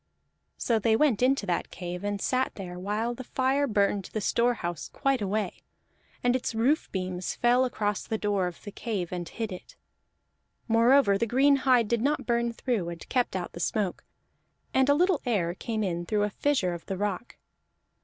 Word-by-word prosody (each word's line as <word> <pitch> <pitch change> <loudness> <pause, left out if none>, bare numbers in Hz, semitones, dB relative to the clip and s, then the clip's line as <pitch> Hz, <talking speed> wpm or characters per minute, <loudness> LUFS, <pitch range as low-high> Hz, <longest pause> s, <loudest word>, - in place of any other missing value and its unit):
So 230 -2 +1
they 220 +1 +3
went 245 -4 +2
into 260 -3 +3
that 175 -3 -1
cave 180 0 -6
and 205 0 -2
sat 255 +5 0
there, 180 -2 -7
while 210 +5 -1
the 255 +2 -8
fire 265 +3 +1
burned 200 -3 +1
the 215 - -1
storehouse 215 -8 0
quite 275 -3 0
away, 200 -1 -2 0.6
and 245 0 +3
its 250 -3 -2
roof 260 +8 +1
beams 185 -1 -3
fell 245 +2 +3
across 210 -5 -2
the 220 - -1
door 205 -3 0
of 175 - -9
the 205 - -7
cave 200 -6 -3
and 175 -2 -4
hid 225 -2 -4
it. 180 - -9 0.9
Moreover 230 -2 +4
the 230 - +1
green 275 +5 +4
hide 255 -4 +3
did 235 0 0
not 290 +4 0
burn 235 0 +1
through, 230 -7 -2
and 170 -1 -8
kept 250 -6 0
out 180 -2 -3
the - - -9
smoke; 195 +1 -1 0.7
and 265 +1 +3
a 285 - +6
little 355 0 +2
air 190 -8 0
came 215 +3 -3
in 175 -3 -2
through 210 -1 +1
a 210 - -1
fissure 230 -9 +1
of 170 - -8
the 195 - -3
rock. 205 +3 -3
220 Hz, 185 wpm, -28 LUFS, 190-250 Hz, 0.9 s, a